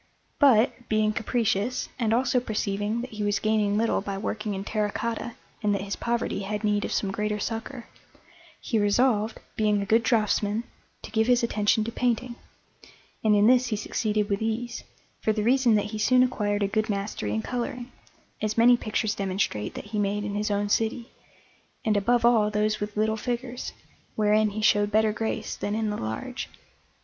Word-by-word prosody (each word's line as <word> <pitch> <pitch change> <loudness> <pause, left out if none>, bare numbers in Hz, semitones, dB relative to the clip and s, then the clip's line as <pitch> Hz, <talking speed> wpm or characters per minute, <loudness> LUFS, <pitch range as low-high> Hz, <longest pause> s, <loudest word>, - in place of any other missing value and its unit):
But, 245 -3 +4
being 215 0 +2
capricious, 230 0 0
and 225 -3 +1
also 250 +2 +2
perceiving 210 -1 -2
that 250 - -7
he 215 -1 -4
was 205 0 +1
gaining 215 -1 +1
little 225 -1 +1
by 200 -1 -4
working 210 0 -3
in 190 - -4
terra 210 0 -1
cotta 230 +1 -3 0.3
and 205 -2 +1
that 195 - -3
his 200 0 -3
poverty 235 -3 -1
had 210 +2 -4
need 210 -1 +1
of - - -3
some 195 - 0
greater 210 +1 -1
succour, 225 +4 -5 0.7
he 225 - -1
resolved, 215 +1 +2 0.2
being 210 -1 +2
a 200 - -2
good 225 +3 +4
draughtsman, 215 -1 +1 0.4
to - - -9
give 220 -1 +2
his 245 -1 +3
attention 215 -1 +2
to 230 - -4
painting; 245 0 -1 0.9
and 215 -1 +4
in 205 0 +4
this 250 +2 +5
he 220 - -1
succeeded 210 0 -1
with 200 0 -1
ease, 225 +2 -3 0.4
for 220 - +1
the 210 -1 -1
reason 245 -1 +4
that 210 0 0
he 215 - -4
soon 255 +4 +5
acquired 205 -4 0
a - - +2
good 215 +2 -1
mastery 200 - -2
in 110 - -2
colouring, 245 0 -4 0.5
as 215 0 -1
many 240 +2 +7
pictures 215 -1 -1
demonstrate 190 - -2
that - - -6
he 210 - 0
made 205 0 0
in 205 0 -3
his 210 +1 -1
own 205 0 0
city, 225 +3 -1 0.7
and 215 -1 +2
above 235 +4 +2
all 225 -3 +4
those 210 0 0
with 210 0 -5
little 220 +1 +1
figures, 245 +2 -4 0.4
wherein 215 0 +3
he 215 +1 -5
showed 205 -1 +4
better 215 0 +3
grace 220 +1 -3
than 205 - -3
in 220 -1 -1
the - - -2
large. 110 - -5
215 Hz, 185 wpm, -26 LUFS, 205-235 Hz, 0.9 s, many